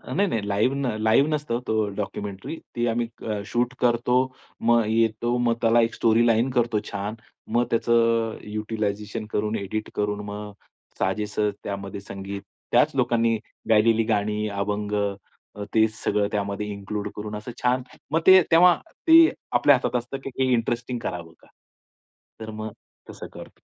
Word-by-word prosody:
नाही, 200 +1 +3
नाही 105 -3 -2
लाईव्ह 105 +6 +1
न 140 -3 -1
लाईव्ह 115 +7 +4
नसतं 145 -6 -1
तो 110 -1 +1
डॉक्युमेंटरी 100 +6 -5 0.2
ती 120 0 0
आम्ही 115 +1 0 0.4
शूट 120 +2 -1
करतो, 125 +1 +2 0.4
मग 120 -1 +4
येतो, 115 +2 +1
मग 120 -1 +2
त्याला 115 0 +4
एक - - -17
स्टोरीलाईन 115 +2 +3
करतो 115 -3 +2
छान. 105 +2 -4 0.4
मग 120 0 +3
त्याचं 115 -1 +2 0.2
युटलायझेशन 105 0 -3
करून, 105 +1 -1
एडिट 105 +2 -4
करून 105 0 -1
मग 105 0 -6 0.5
साजेस 105 +2 -1 0.3
त्यामध्ये 100 0 -5
संगीत: 100 0 -7 0.3
त्याच - - +4
लोकांनी 115 -1 +2 0.3
गायलेली 115 +1 +4
गाणी, 105 -1 0
अभंग, 105 +1 -2 0.8
तेच 110 -1 +3
सगळं 105 -1 +1
त्यामध्ये 100 0 -2
इन्क्लूड 100 +1 -4
करून 105 0 -5
असं 105 +3 -6
छान 125 +1 +2 0.3
मग 160 - +3
ते 190 0 +9
तेव्हा 175 +1 +7 0.3
ते 325 0 +9 0.3
आपल्या 130 +4 +5
हातात 125 -1 -2
असतं, 120 +3 -6
की 135 - -4
हे 130 -1 +2
इंटरेस्टिंग 120 +1 -1
करावं 85 -3 -5
का? - - -22 0.9
तर 110 0 -7
मग 110 0 -4 0.4
तसं - - -8
करतो. - - -12
110 Hz, 145 wpm, -24 LUFS, 105-120 Hz, 0.9 s, ते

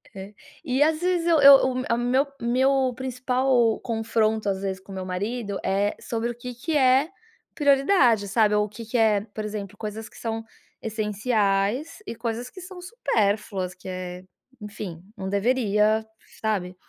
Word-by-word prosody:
É 190 - -6 0.4
e 260 -1 0
às 310 0 +1
vezes 355 -1 0
eu 330 -3 +4
eu 280 0 +10
o 260 - -2
meu 255 0 -2
a 235 - +2
meu 250 +4 +1
meu 260 +2 +2
principal 250 -2 +1
confronto 220 -2 0
às 190 -1 -2
vezes 190 -1 -3
com 190 +1 -15
o - - -7
meu 185 -1 -5
marido 200 +3 -3
é 200 +2 0
sobre 230 0 -2
o 240 - -5
que 250 +1 -7
que 285 +7 -3
é 265 +2 +4 0.5
prioridade, 275 - +3
sabe? 210 +1 +3
Ou 210 0 +2
o - - -9
que 225 +3 -9
que 230 +3 -2
é, 215 -3 +3
por 215 - -4
exemplo, 205 -2 -6
coisas 215 +1 -6
que - - -17
são 225 -1 -4 0.4
essenciais 215 - -1
e - - -5
coisas 235 +1 -4
que 370 - -11
são 365 0 -10
supérfluas, 210 - -1
que 185 +1 -14
é 180 0 -6 0.4
enfim, 200 -5 -7
não 190 0 -5
deveria, 215 0 +2 0.4
sabe? 195 -5 -1
225 Hz, 175 wpm, -25 LUFS, 205-255 Hz, 0.5 s, eu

